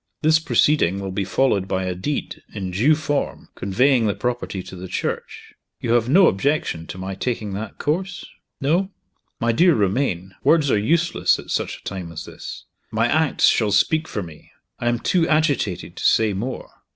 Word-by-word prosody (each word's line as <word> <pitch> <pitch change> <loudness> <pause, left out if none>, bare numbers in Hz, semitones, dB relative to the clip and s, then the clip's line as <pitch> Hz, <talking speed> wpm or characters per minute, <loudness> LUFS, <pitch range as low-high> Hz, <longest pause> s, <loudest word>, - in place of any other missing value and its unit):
This 155 +1 +5
proceeding 145 - +2
will 95 -1 -4
be 100 +1 -1
followed 95 +1 +1
by 95 -1 -1
a 90 0 -2
deed, 115 +12 -4
in 95 -3 -4
due 125 +12 +3
form, 145 -2 -3
conveying 115 +5 +2
the 100 - 0
property 120 -6 -3
to - - -10
the 90 +1 -7
Church. - - -4 0.3
You 115 - -2
have 120 0 +2
no 185 +7 +6
objection 95 - 0
to - - -7
my 95 +1 -5
taking 105 0 -3
that 105 +3 -6
course? 180 +5 -2 0.3
No? 170 +8 +1 0.5
My 115 0 +2
dear 170 +8 +4
Romayne, 95 -3 0
words 155 -4 +4
are 105 - +3
useless 170 +10 +2
at - - -9
such - - -1
a - - -21
time 90 -4 -6
as 80 -1 -7
this. - - -9 0.2
My 110 +1 +1
acts 160 +3 +3
shall 110 -3 +3
speak 155 +10 +2
for 105 - -4
me. 80 -3 -13 0.3
I 120 - 0
am 120 - +1
too 165 +7 +1
agitated 145 - 0
to - - -6
say 110 -2 +3
more. 120 +7 -5
115 Hz, 185 wpm, -22 LUFS, 95-150 Hz, 0.5 s, no